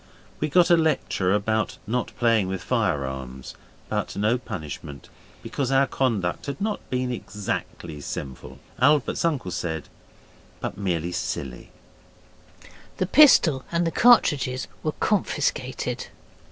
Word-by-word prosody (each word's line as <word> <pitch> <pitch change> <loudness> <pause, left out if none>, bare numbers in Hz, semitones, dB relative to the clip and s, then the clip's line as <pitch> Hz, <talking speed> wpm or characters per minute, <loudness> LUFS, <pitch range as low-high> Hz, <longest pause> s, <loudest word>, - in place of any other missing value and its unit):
We 155 - -1
got 175 +3 +4
a - - +9
lecture 155 - +1
about 105 +2 0
not 120 +3 -2
playing 115 -5 +3
with 95 -1 -4
firearms, 65 - -2 0.3
but - - -2
no 110 +5 +1
punishment, 75 - -7 0.3
because 135 -2 -2
our 135 +1 +5
conduct 115 -10 -1
had 140 -1 -4
not 210 +1 -3
been 125 0 -1
exactly 100 -8 -5
sinful, 65 -2 -7 0.2
Albert's 145 +1 +3
uncle 145 - 0
said, 80 -4 -4 0.7
but - - -4
merely 90 -4 -2
silly. 65 -7 -4 1.3
The 185 - +1
pistol 180 - +6
and 170 0 +1
the 165 - 0
cartridges 145 - +4
were 155 - -1
confiscated. 210 -2 -1
115 Hz, 120 wpm, -25 LUFS, 90-145 Hz, 1.3 s, a